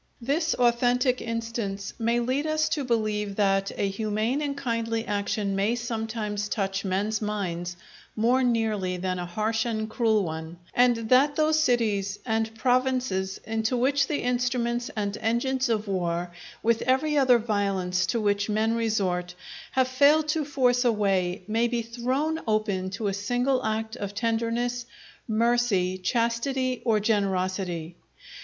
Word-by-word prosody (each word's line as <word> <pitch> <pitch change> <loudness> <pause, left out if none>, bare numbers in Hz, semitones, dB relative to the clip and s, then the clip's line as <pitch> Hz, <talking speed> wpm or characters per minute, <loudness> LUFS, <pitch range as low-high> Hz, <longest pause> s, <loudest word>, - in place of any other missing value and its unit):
This 295 +7 0
authentic 245 +1 +2
instance 230 -4 -4
may 235 +1 +1
lead 260 +5 0
us 310 0 +1
to 290 - -1
believe 215 -4 -1
that 195 -1 +2
a 200 - +1
humane 215 +6 -1
and 285 -1 -2
kindly 230 -4 -2
action 205 -1 -1
may 205 +4 +1
sometimes 220 -3 -3
touch 195 -2 -1
men's 205 +3 -1
minds 175 -5 -3 0.4
more 240 +4 +3
nearly 220 -7 0
than 185 0 -2
a 175 - -4
harsh 220 +4 0
and 220 -2 -2
cruel 220 -2 +2
one; 160 0 -5 0.2
and 245 0 +4
that 280 +3 +5
those 310 +1 +3
cities 215 -8 +1
and 225 -1 -1
provinces 250 -6 0
into 225 +2 -1
which 275 +3 +2
the 295 - -2
instruments 245 -1 0
and 205 -1 -2
engines 255 +3 0
of 220 -2 0
war, 175 -2 -1 0.3
with 230 0 +2
every 290 +4 +2
other 260 -4 +5
violence 195 -5 0
to 230 - 0
which 205 0 0
men 215 +2 +1
resort, 190 -6 -1 0.4
have 260 -1 +3
failed 290 +4 +4
to 310 0 +1
force 255 -3 +2
a 240 - +4
way, 190 -4 0
may 225 +2 +2
be 235 -1 -1
thrown 255 +7 -1
open 210 -4 0
to 200 +3 -5
a 200 - 0
single 245 +6 0
act 220 +1 -2
of 205 0 -5
tenderness, 235 +2 -1 0.4
mercy, 225 -5 +2
chastity, 245 +4 0
or 220 -3 +3
generosity. 185 -5 -1
225 Hz, 145 wpm, -26 LUFS, 200-245 Hz, 0.4 s, that